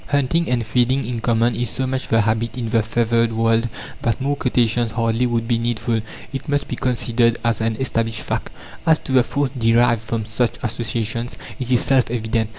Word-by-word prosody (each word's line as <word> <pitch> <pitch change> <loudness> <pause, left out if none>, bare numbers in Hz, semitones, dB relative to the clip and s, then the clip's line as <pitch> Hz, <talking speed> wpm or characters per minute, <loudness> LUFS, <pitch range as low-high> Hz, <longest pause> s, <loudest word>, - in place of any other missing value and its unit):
Hunting 145 +4 +1
and 120 -2 0
feeding 125 +4 +1
in 120 -1 -3
common 115 0 +2
is 120 -1 -1
so 130 - -2
much 130 0 -2
the 115 0 +3
habit 110 +2 -1
in 115 -3 -3
the 115 0 +3
feathered 115 +1 +1
world 115 +1 +2 0.3
that 115 -5 0
more 140 +2 0
quotations 120 -3 +1
hardly 115 +1 +1
would 115 -1 -1
be 115 -1 +1
needful: 115 -1 -1 0.3
it 135 +3 -5
must 145 -1 0
be - - -3
considered 120 -1 +1
as 115 -1 +1
an 110 0 0
established 115 -3 -1
fact. - - -3 0.4
As 160 -1 +6
to - - -8
the 130 -1 +6
force 140 +2 -1
derived 120 -2 +3
from 110 -1 -3
such 115 +2 0
associations, 115 0 -2 0.2
it 125 -2 -4
is 125 - +4
self 130 -4 +2
evident. 115 -1 -1
115 Hz, 195 wpm, -21 LUFS, 115-125 Hz, 0.4 s, As